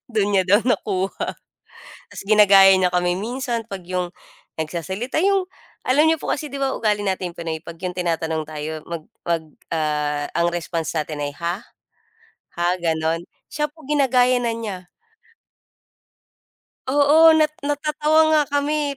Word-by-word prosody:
Dun 210 Hz, -3 st, 0 dB
niya 190 Hz, -2 st, +3 dB
daw 205 Hz, +3 st, +5 dB
nakuha. 195 Hz, -6 st, -1 dB, 0.8 s
Tas -, -, -8 dB
ginagaya 200 Hz, -2 st, +7 dB
niya 185 Hz, -1 st, +2 dB
kami 180 Hz, 0 st, +1 dB
minsan 235 Hz, +3 st, -3 dB
'pag 195 Hz, -2 st, -6 dB
yung 180 Hz, 0 st, -2 dB, 0.5 s
nagsasalita, 190 Hz, -, -3 dB
yung 390 Hz, 0 st, +2 dB, 0.4 s
alam 275 Hz, +4 st, +4 dB
n'yo 320 Hz, -, +2 dB
po -, -, -7 dB
kasi 300 Hz, 0 st, -5 dB
di 280 Hz, -, -5 dB
ba, 270 Hz, -1 st, 0 dB
ugali 210 Hz, -2 st, 0 dB
natin 185 Hz, -2 st, -2 dB
pinoy 160 Hz, -2 st, -4 dB
'pag 170 Hz, -, -9 dB
yung 180 Hz, 0 st, -4 dB
tinatanong 165 Hz, -3 st, -1 dB
tayo, 155 Hz, 0 st, -6 dB
mag 165 Hz, -2 st, -5 dB, 0.2 s
mag 170 Hz, -1 st, -1 dB, 0.3 s
ah, 150 Hz, -2 st, -1 dB
ang 170 Hz, 0 st, +2 dB
response 165 Hz, -2 st, -3 dB
natin 150 Hz, -1 st, -3 dB
ay, 145 Hz, -, -3 dB
"Ha? 175 Hz, +5 st, -3 dB, 1.0 s
Ha?" 175 Hz, -, +1 dB
gano'n. 165 Hz, 0 st, -1 dB, 0.3 s
Siya 300 Hz, 0 st, -1 dB
po, 305 Hz, +2 st, -19 dB
ginagaya 255 Hz, -4 st, +3 dB
na 235 Hz, -1 st, -1 dB
niya. 200 Hz, -6 st, -6 dB, 2.0 s
Oo, 300 Hz, +4 st, +6 dB
nat 310 Hz, -1 st, +3 dB, 0.2 s
natatawa 300 Hz, +2 st, +1 dB
nga 305 Hz, -1 st, +5 dB
kami 285 Hz, 0 st, -1 dB
195 Hz, 145 wpm, -22 LUFS, 170-275 Hz, 2.0 s, ginagaya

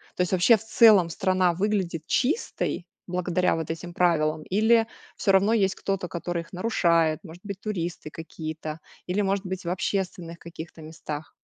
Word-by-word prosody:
То -, -, -1 dB
есть 180 Hz, -, 0 dB
вообще, 185 Hz, +5 st, +6 dB
в 215 Hz, -, -6 dB
целом, 215 Hz, -5 st, +6 dB
страна 185 Hz, 0 st, +2 dB
выглядит 185 Hz, -4 st, -1 dB
чистой 270 Hz, -, -1 dB, 0.2 s
благодаря 180 Hz, 0 st, +1 dB
вот 160 Hz, -1 st, -4 dB
этим 170 Hz, +2 st, -5 dB
правилам 155 Hz, -3 st, +2 dB
или 220 Hz, +5 st, +3 dB, 0.3 s
всё 200 Hz, -, +2 dB
равно 195 Hz, +3 st, +4 dB
есть 195 Hz, -4 st, +2 dB
кто-то, 195 Hz, -2 st, -2 dB
который 170 Hz, 0 st, -3 dB
их 165 Hz, -, -15 dB
нарушает- 170 Hz, -5 st, +2 dB
может 175 Hz, 0 st, -12 dB
быть, 200 Hz, -2 st, -5 dB
туристы 175 Hz, -6 st, -4 dB
какие-то 155 Hz, -1 st, -6 dB, 0.3 s
или, 185 Hz, +3 st, 0 dB
может 195 Hz, 0 st, 0 dB
быть, 185 Hz, 0 st, -4 dB
в -, -, -2 dB
общественных 180 Hz, -2 st, -3 dB
каких-то 165 Hz, -1 st, -10 dB
местах? 155 Hz, -1 st, -7 dB
180 Hz, 160 wpm, -26 LUFS, 165-195 Hz, 0.3 s, вообще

